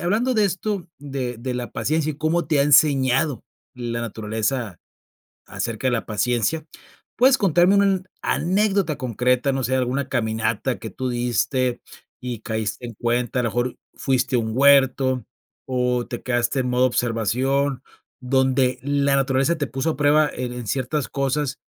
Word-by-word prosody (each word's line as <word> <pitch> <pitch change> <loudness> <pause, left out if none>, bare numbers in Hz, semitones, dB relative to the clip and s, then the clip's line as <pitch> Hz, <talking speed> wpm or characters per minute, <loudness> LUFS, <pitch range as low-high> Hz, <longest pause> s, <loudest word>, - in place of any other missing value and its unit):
hablando 220 +9 +1
de 215 -4 +3
esto, 190 0 -3
de 135 -3 -4
de 125 +3 -4
la 125 -1 -4
paciencia 155 0 -1
y - - -13
cómo 160 +3 0
te 150 -3 +2
ha - - +5
enseñado 140 -2 +3 0.3
la 120 -2 -4
naturaleza 110 -1 -3 0.7
acerca 115 +2 -3
de - - +2
la 120 -2 -1
paciencia, 120 +8 0 0.5
¿puedes 260 +2 +5
contarme 185 -1 +4
una 200 0 +4
an 190 -2 +1 0.2
anécdota 190 0 +1
concreta? 125 +1 +1
No 135 - -2
sé, 130 +2 0
alguna 130 +2 -1
caminata 110 0 -1
que 110 - -6
tú 130 +2 -4
diste 120 +1 0 0.4
y 125 -3 -5
caíste 110 +1 -3
en 115 - -8
cuenta, 120 +2 -1
a 125 - 0
lo 115 - 0
mejor 120 +3 -2 0.2
fuiste 130 -1 0
a - - +3
un 110 -1 -3
huerto 135 -2 +4 0.4
o 125 -1 0
te 120 - -6
quedaste 120 +2 0
en 125 - -2
modo 125 +1 +3
observación, 130 +3 0 0.4
donde 130 0 +1
la 140 0 +1
naturaleza 135 +4 +1
te 145 -2 -2
puso 135 +5 -1
a - - -6
prueba 150 +1 +4
en 125 -1 -4
en 120 -2 -7
ciertas 135 +5 -1
cosas 140 +1 -1
130 Hz, 165 wpm, -22 LUFS, 120-145 Hz, 0.7 s, ha